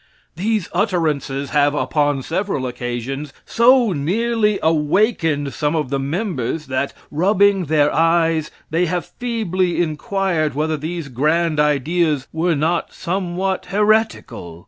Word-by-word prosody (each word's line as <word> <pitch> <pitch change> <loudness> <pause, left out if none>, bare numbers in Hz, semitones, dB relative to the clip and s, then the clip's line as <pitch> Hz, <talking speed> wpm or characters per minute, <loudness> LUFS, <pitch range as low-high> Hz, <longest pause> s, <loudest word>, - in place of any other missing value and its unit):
These 210 +2 -1
utterances 155 -8 -1
have 145 -1 +3
upon 145 +1 0
several 175 -5 -2
occasions 125 +3 -4
so 240 -1 +4
nearly 210 +7 +1
awakened 160 - +1
some 150 +3 -1
of 150 -4 -2
the 140 - 0
members, 155 - -2
that, 130 +1 -2 0.2
rubbing 195 +3 +3
their 150 -1 +2
eyes, 165 -1 +2 0.2
they 170 +2 +1
have 175 +1 -2
feebly 190 -8 -2
inquired 165 -1 -1
whether 155 +2 0
these 160 +1 -5
grand 155 +5 +1
ideas 150 0 +1
were 165 +1 +1
not 160 +4 0
somewhat 185 +1 -2
heretical? 210 - 0
160 Hz, 120 wpm, -20 LUFS, 145-190 Hz, 0.2 s, so